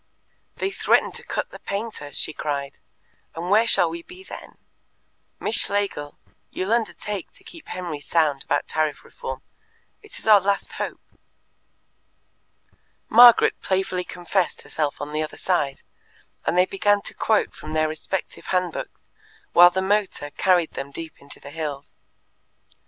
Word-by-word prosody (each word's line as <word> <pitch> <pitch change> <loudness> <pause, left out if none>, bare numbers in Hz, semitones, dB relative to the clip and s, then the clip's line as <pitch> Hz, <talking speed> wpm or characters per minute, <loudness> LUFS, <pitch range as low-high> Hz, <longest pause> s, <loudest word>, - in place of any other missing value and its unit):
"They 390 - -2
threaten - - +2
to - - -4
cut - - -3
the - - -10
painter," 200 -8 -5
she 155 - -1
cried, 140 -2 -4 0.6
"and 175 +3 -4
where 220 +3 +5
shall 175 - +5
we 165 +1 -5
be 365 - -13
then? - - -11 0.8
Miss 220 - 0
Schlegel, 200 -8 +2 0.3
you'll 190 +4 -1
undertake 210 -4 -2
to - - -16
keep 335 -2 -13
Henry 175 -5 -5
sound 145 -2 +1
about 145 - -1
Tariff 155 -2 -1
Reform? 130 0 -7 0.6
It 425 -2 -12
is - - -11
our 215 -2 +8
last 200 +1 -1
hope." - - -4 2.1
Margaret 240 0 +7
playfully 190 -1 -1
confessed 180 +1 -2
herself 150 -2 -2
on 145 +1 -5
the 155 - 0
other 155 - -5
side, 145 -7 -1 0.6
and 175 - +1
they 180 - +6
began 205 +1 +1
to - - -3
quote 220 -1 +1
from 155 - -8
their 155 0 +2
respective 155 +4 -5
hand 180 -2 0
books - - -8 0.5
while 175 +1 +9
the 190 +1 -1
motor 195 -7 0
carried 180 -2 +2
them 135 +1 -6
deep 160 +3 -8
into 140 - -9
the 140 - -11
hills. 145 -3 -5
175 Hz, 150 wpm, -24 LUFS, 150-200 Hz, 2.1 s, while